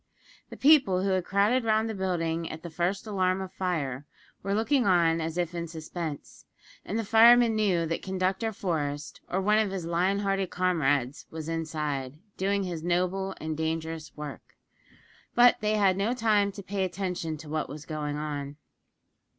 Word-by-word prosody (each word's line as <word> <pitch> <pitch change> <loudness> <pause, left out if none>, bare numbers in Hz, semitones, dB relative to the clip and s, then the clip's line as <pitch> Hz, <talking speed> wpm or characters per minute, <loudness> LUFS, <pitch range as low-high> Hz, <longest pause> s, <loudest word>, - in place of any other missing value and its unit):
The - - -9
people 265 -11 +5
who 195 - +1
had 185 -2 0
crowded 210 +6 +2
round 220 0 +2
the 220 - -3
building 170 -4 -1
at 160 - -8
the 170 - -7
first 180 +5 -1
alarm 190 -3 0
of 190 -1 -6
fire, 145 -8 -2 0.3
were 200 +1 -1
looking 240 +3 +2
on 165 -3 +3
as 160 +1 -3
if 175 -1 -1
in 170 -1 -4
suspense, 160 -1 -7 0.4
and 210 - -3
the 225 - -2
firemen 230 +2 +6
knew 190 -6 +2
that 165 +1 -2
Conductor 190 +3 -1
Forest, 150 -7 -3
or 185 - 0
one 210 +3 +3
of 215 -2 +1
his 190 -3 -4
lion 180 +4 +1
hearted 195 -2 0
comrades, 145 -7 0
was 160 -1 -7
inside, 150 -4 -3 0.2
doing 200 +1 0
his 175 -4 -4
noble 185 +2 0
and 155 0 -3
dangerous 160 0 -3
work. 150 -2 -8 0.8
But 245 0 +6
they 215 0 +1
had 195 -3 +3
no 215 +5 0
time 210 -4 +2
to 200 0 -8
pay 195 +1 -2
attention 180 -4 -3
to 155 - -11
what 155 -1 -2
was 150 +2 -8
going 150 -2 -3
on. 145 -1 -4
180 Hz, 175 wpm, -28 LUFS, 160-200 Hz, 0.8 s, firemen